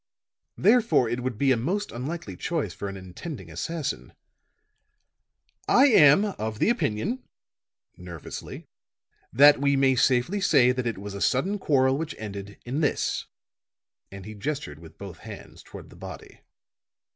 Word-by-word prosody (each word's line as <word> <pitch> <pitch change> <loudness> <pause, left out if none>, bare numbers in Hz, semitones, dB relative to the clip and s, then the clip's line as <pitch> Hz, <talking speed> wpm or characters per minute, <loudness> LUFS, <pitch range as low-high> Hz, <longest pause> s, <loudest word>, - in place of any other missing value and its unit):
Therefore, 225 - +4
it 120 +2 -2
would 125 -3 -3
be 135 +2 +2
a - - +5
most 185 - -2
unlikely 155 +8 -5
choice 150 - -3
for 100 - -5
an 100 - -7
intending 95 - -9
assassin. 145 - -4 1.5
I 275 +3 +6
am 185 - +6
of 110 0 -3
the - - +2
opinion," 195 - -1 0.8
nervously, 85 -3 -9 0.7
"that 145 +3 +6
we 140 0 +3
may 135 -1 +3
safely 130 +10 +2
say 125 -9 +5
that 125 -1 -2
it 115 - -2
was 100 +1 -7
a 100 - -7
sudden 190 +11 +1
quarrel 135 -5 +2
which 160 -1 -4
ended 100 -1 -7
in 130 +5 -2
this," 150 -3 -1 0.8
and 100 -1 -9
he 110 - -8
gestured 110 - -5
with 80 -1 -14
both 95 -4 -9
hands - - -11
toward - - -12
the - - -14
body. - - -11
130 Hz, 145 wpm, -26 LUFS, 105-155 Hz, 1.5 s, I